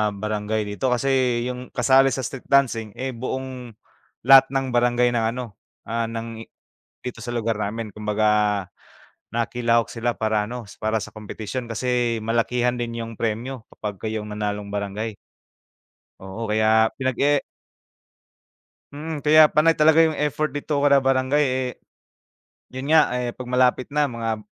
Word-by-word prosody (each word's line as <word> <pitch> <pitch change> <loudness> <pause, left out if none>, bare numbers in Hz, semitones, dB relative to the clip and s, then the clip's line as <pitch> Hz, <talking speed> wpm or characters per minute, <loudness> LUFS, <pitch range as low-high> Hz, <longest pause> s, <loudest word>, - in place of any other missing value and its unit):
barangay 105 +1 -2
dito. 105 +6 -3
Kasi 125 -1 +1
'yong 125 0 -6
kasali 130 +2 +5
sa 130 -1 -1
street 125 +2 -6
dancing, 115 -6 +2
eh, 130 0 -3
buong 125 -1 -6 0.5
lahat 135 +2 +8
ng 135 -1 -2
barangay 120 0 +3
ng 115 -2 0
ano, 120 -6 -7 0.2
ah, 115 0 -2
ng 115 0 -6
i 115 - -10 0.6
dito 125 - -6
sa 120 - -5
lugar 115 -1 -1
namin 110 +2 -3
kumbaga 105 -2 +1 0.7
nakilahok 115 0 +1
sila 120 0 -1
para 110 -1 0
ano, 120 -2 -6 0.2
para 110 +1 +1
sa - - -6
kompetisyon 110 +3 -6
kasi 120 0 0
malakihan 120 +2 0
din 115 -1 -4
'yong 115 0 -6
premyo 115 +2 -3
kapag 105 -2 -6
kayo 110 0 -3
ang 105 - -9
manalong 105 -1 -3
barangay. 105 +2 -3 1.1
Oo, 95 +4 -6
kaya 110 +1 +4
pinag-e 135 +2 +1 1.5
Mm, 150 0 -6
kaya 155 0 +7
panay 165 +2 +4
talaga 160 +1 +5
'yong 160 - 0
effort 150 0 -1
dito 145 0 -2
kada 140 -1 +5
barangay, 135 +2 +2
eh 130 -2 0 1.1
'Yon 130 +3 -4
nga, 160 -5 +5
eh, 125 -1 -1
'pag 125 +1 -9
malapit 125 0 +2
na 150 -2 +2
mga, 115 -2 -3
120 Hz, 145 wpm, -23 LUFS, 110-130 Hz, 1.5 s, lahat